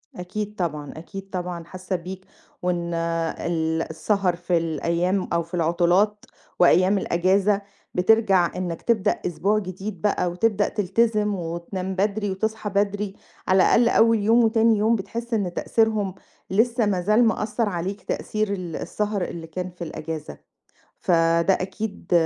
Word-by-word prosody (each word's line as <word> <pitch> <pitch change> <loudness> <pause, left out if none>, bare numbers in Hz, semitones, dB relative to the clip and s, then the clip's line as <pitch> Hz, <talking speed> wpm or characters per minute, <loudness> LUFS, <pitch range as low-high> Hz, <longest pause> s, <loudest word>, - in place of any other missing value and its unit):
أكيد 205 +4 -5
طبعًا، 150 -6 -3
أكيد 195 +4 -9
طبعًا 180 -2 -4
حاسّة 185 +2 -5
بيك، 185 +2 -7 0.4
وإن 175 -1 -1
ال 165 -1 -1
السهر 180 +3 0
في 175 0 0
الأيّام 170 +4 0
أو 170 0 +2
في 170 - -20
العُطلات 175 +5 +2 0.3
وأيّام 185 +3 +5
الأجازة، 195 +3 +2 0.3
بترجع 190 -2 +4
إنّك 175 -3 -3
تبدأ 225 -5 +2
أسبوع 200 +4 +1
جديد 190 -1 -6
بقى 180 -4 +1
وتبدأ 205 +2 +1
تلتزم 210 +1 +1
وتنام 180 +2 -4
بدري 205 +1 0
وتصحى 220 +2 -2
بدري، 200 0 0 0.3
على 185 0 +5
الأقل 235 0 +4
أوّل 230 -1 +4
يوم 225 +3 +4
وتاني 225 0 +4
يوم 220 +3 +3
بتحس 230 +4 -5
إن 195 -5 0
تأثيرهم، 215 -2 +1 0.3
لسّه 230 +4 +2
ما 195 -3 +1
زال 215 +6 +4
مأثّر 220 0 0
عليك 190 +2 -3
تأثير 215 +2 -2
ال 180 -4 -5
السهر 210 -1 -2
اللي 170 -2 -5
كان 180 +3 -4
في 180 0 -8
الأجازة، 155 -1 -6 0.6
فده 170 0 +3
أكيد 195 +2 -5
190 Hz, 135 wpm, -24 LUFS, 175-210 Hz, 0.6 s, وأيّام